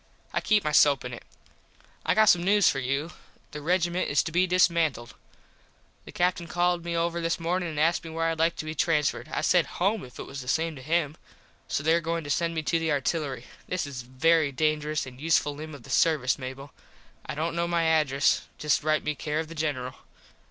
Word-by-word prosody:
I - - 0
keep 210 -2 +2
my 150 - -1
soap 145 -3 +4
in 125 - -5
it. 120 - -8 0.8
I - - +1
got 215 - +6
some 180 -5 +5
news 205 +2 +4
for 135 - +2
you. 140 +6 -2 0.4
The 150 - -7
regiment 175 +2 0
is 145 -1 +2
to 165 - -5
be 180 +3 +2
dismantled. 170 -9 +2 0.9
The - - -10
Captin 175 -1 0
called 175 +1 0
me 170 0 -2
over 170 0 -1
this 165 +1 -1
mornin 175 +1 -1
and 155 -2 -4
asked 165 +3 +2
me 165 - -8
where 165 0 -1
Id 165 - -5
like 165 +1 +2
to - - -6
be 155 - -4
transferred. 150 -1 0
I - - -1
said - - +3
home 200 +5 +1
if 125 -1 -12
it - - -6
was 140 0 -7
the 125 - -11
same 160 +3 0
to 130 - -10
him. 155 +1 0 0.5
So 140 - -2
there 165 +2 +3
goin 165 0 -2
to 145 - -4
send 165 +2 0
me 160 - -2
to 165 +2 +1
the 165 -1 -1
artillery. 140 -3 -1 0.2
This 180 -3 -2
is 135 -3 -6
a - - -15
very 150 +4 +2
dangerous 155 +1 0
and 130 0 -11
useful 155 -2 +2
limb 155 +1 -8
of 135 - -13
the - - -10
servus, 145 -6 +2
Mable. 135 +2 -8 0.5
I - - -4
dont 165 +3 -2
kno 170 0 0
my 170 -1 +1
address. 155 -4 +2
Just 150 -2 +1
write 155 0 +1
me 150 - -1
care 150 +1 -3
of 160 -1 -4
the - - -8
General. 145 -5 -3
160 Hz, 225 wpm, -27 LUFS, 145-170 Hz, 0.9 s, got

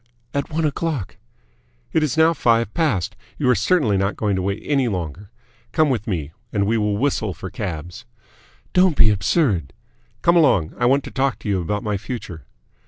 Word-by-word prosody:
"At 140 0 -2
one 160 0 -1
o'clock." 150 - -2 0.8
"It 160 - +3
is 155 -1 0
now 160 +1 +5
five 115 -7 +2
past. 125 - 0 0.2
You 140 - 0
are - - +6
certainly 110 - +2
not 100 +2 0
going 105 -2 0
to 95 - -1
wait 100 +3 -2
any 135 -4 +2
longer. 90 -1 -4 0.4
Come 155 -3 +3
with 115 -4 -2
me, 80 -8 -2 0.2
and 100 -1 +1
we 110 +3 +1
will 105 -2 +1
whistle 110 - 0
for 95 +2 -7
cabs." 90 -4 -6 0.7
"Don't 180 -4 +4
be 110 -1 +6
absurd!" 95 - +1 0.5
"Come 170 - +5
along. 130 - +3
I 120 - +3
want 140 +2 +3
to - - -8
talk 135 -5 0
to - - -7
you 95 -2 +1
about 105 +5 -2
my 105 -2 -1
future." 95 - -7
110 Hz, 185 wpm, -21 LUFS, 95-140 Hz, 0.8 s, are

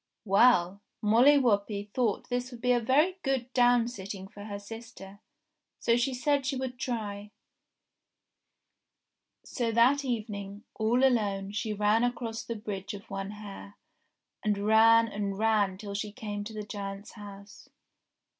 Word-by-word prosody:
Well! 195 -2 +4 0.2
Molly 240 +7 +6
Whuppie 205 -4 0
thought 235 -5 0
this 245 0 -2
would 245 -2 -10
be 250 +1 +1
a 245 - +4
very 300 +11 +2
good 260 -2 -2
downsitting 230 -6 +1
for 205 0 -10
her 205 -1 -5
sister, 205 -2 -11 0.6
so 230 - +2
she 245 +3 +1
said 280 +2 +1
she 270 +1 -1
would 255 -1 -4
try. 210 -5 -4 2.2
So 235 -3 -2
that 250 +5 +4
evening, 210 -4 -4
all 235 +4 +1
alone, 200 -6 +1
she 215 +1 -3
ran 210 +2 +2
across 240 -2 -2
the 230 - -5
Bridge 205 -2 -5
of 200 - -12
One 195 0 -4
Hair, 205 -1 -10 0.7
and 210 -1 +1
ran 225 +1 +6
and 200 -2 -3
ran 210 -3 +2
till 200 0 -7
she 205 +1 -3
came 205 -1 -5
to 220 - -7
the 215 -1 -5
giant's 200 -1 -7
house. 205 -1 -12
215 Hz, 145 wpm, -29 LUFS, 200-245 Hz, 2.2 s, Molly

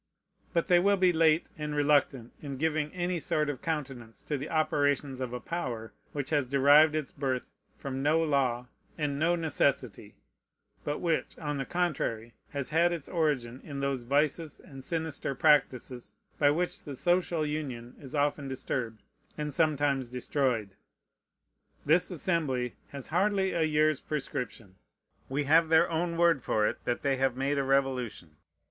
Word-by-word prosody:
But 170 -2 +1
they 175 -1 +5
will 200 +2 +3
be 185 -1 +4
late 160 0 +3
and 150 0 -3
reluctant 145 -4 +2
in 140 -3 -6
giving 155 0 0
any 180 -1 -2
sort 150 -1 0
of 135 - -9
countenance 135 -8 -4
to 150 - -2
the 140 +2 -5
operations 145 -4 0
of 125 -2 -3
a 125 - -4
power 120 -9 -4 0.2
which 145 0 -4
has 145 -4 +1
derived 145 +3 +6
its 155 -3 -2
birth 130 -3 -3 0.3
from 135 -1 -4
no 150 +3 +3
law 130 -5 +1 0.3
and 145 -3 -1
no 170 +3 +3
necessity, 140 -9 -1 0.7
but 145 - -2
which, 165 -3 -1
on 150 -2 -3
the 135 - -2
contrary, 125 -10 -2 0.2
has 140 -3 -4
had 170 +3 +3
its 170 -5 -4
origin 135 -7 -1
in 140 -2 -6
those 140 -2 -1
vices 145 +5 0
and 135 -2 -12
sinister 160 -4 -1
practices 130 -4 +1 0.2
by 145 - +5
which 175 +5 -1
the 145 -3 -7
social 175 +1 +1
union 135 -6 -4
is 135 0 -8
often 145 -1 0
disturbed 125 -4 -4 0.3
and 150 -1 -3
sometimes 145 -4 +1
destroyed. 125 -4 -1 1.1
This 165 +5 +4
Assembly 150 - 0
has 140 -2 -7
hardly 190 +2 +1
a 170 - -1
year's 155 -2 +2
prescription. 125 -9 -5 0.5
We 140 +3 0
have 160 +3 +4
their 160 +1 +5
own 170 +1 -1
word 170 -5 +4
for 105 -2 +1
it - - -2
that 120 - -1
they 135 -2 +1
have 130 -1 +1
made 140 +2 0
a - - +1
revolution. 130 - -1
145 Hz, 160 wpm, -29 LUFS, 130-160 Hz, 1.1 s, derived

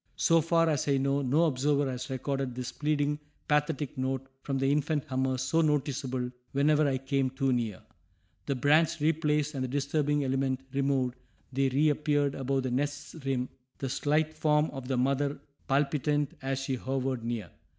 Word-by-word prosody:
So 165 -1 +4
far 165 +1 +3
as 150 -3 0
I 140 -1 +3
know 140 +1 +1
no 140 +5 +3
observer 145 -1 +2
has 125 0 -5
recorded 135 -1 -2
this 125 -1 -4
pleading, 150 -1 0 0.3
pathetic 150 -2 0
note 130 0 -1 0.2
from 135 -1 -2
the 135 +1 +2
infant 150 0 0
hummers 130 -1 -1
so 165 +5 +2
noticeable 135 -4 0 0.2
whenever 150 +2 +3
I 135 -1 +1
came 135 0 0
too 135 0 0
near. 115 -6 -2 0.6
The 140 - +1
branch 155 +5 +3
replaced 150 -1 +1
and 135 -2 -2
the - - -1
disturbing 145 +2 0
element 135 -1 0
removed, 135 -2 +1 0.4
they 135 +1 +2
reappeared 145 0 +2
above 135 0 -1
the 130 - -2
nest's 145 +2 -2
rim, 130 -2 -1 0.3
the 135 - -3
slight 150 +4 +1
form 155 0 +2
of 135 -2 -7
the 130 -1 0
mother 140 +3 +1 0.3
palpitant 145 +1 +1
as 135 0 -1
she 135 -1 -2
hovered 130 -1 -2
near. 115 -8 -3
140 Hz, 165 wpm, -29 LUFS, 130-150 Hz, 0.6 s, So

